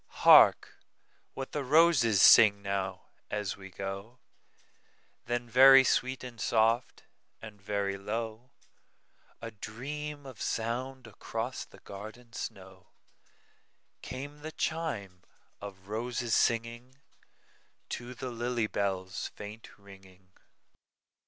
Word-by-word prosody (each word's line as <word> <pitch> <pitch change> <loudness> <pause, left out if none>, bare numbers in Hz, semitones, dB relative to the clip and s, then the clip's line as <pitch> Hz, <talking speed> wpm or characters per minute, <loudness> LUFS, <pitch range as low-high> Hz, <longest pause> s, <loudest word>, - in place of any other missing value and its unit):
"Hark - - +6 0.6
what 135 0 -6
the 150 - -3
roses 135 - +4
sing 100 -3 +7
now, 100 -1 -3 0.3
as 105 -2 -3
we 95 -1 -12
go;"Then 110 +4 -9
very 135 +3 +8
sweet 130 +1 0
and 120 -3 -9
soft, 115 +2 +1 0.4
and 105 -3 -12
very 100 -1 -2
low,—A 115 +1 -9
dream 145 +7 -7
of 130 -5 -11
sound 125 +3 -3
across 115 +3 -5
the - - -18
garden 110 +4 -11
snow,—Came 100 +8 -11
the 155 +2 -7
chime 105 - -3 0.4
of 95 -2 -10
roses 120 +2 -3
singingTo 120 +1 -4
the 130 - -5
lily 120 -1 -1
bell's 95 -3 -3
faint 105 +2 -10
ringing. 95 -2 -17
115 Hz, 95 wpm, -30 LUFS, 100-125 Hz, 0.6 s, very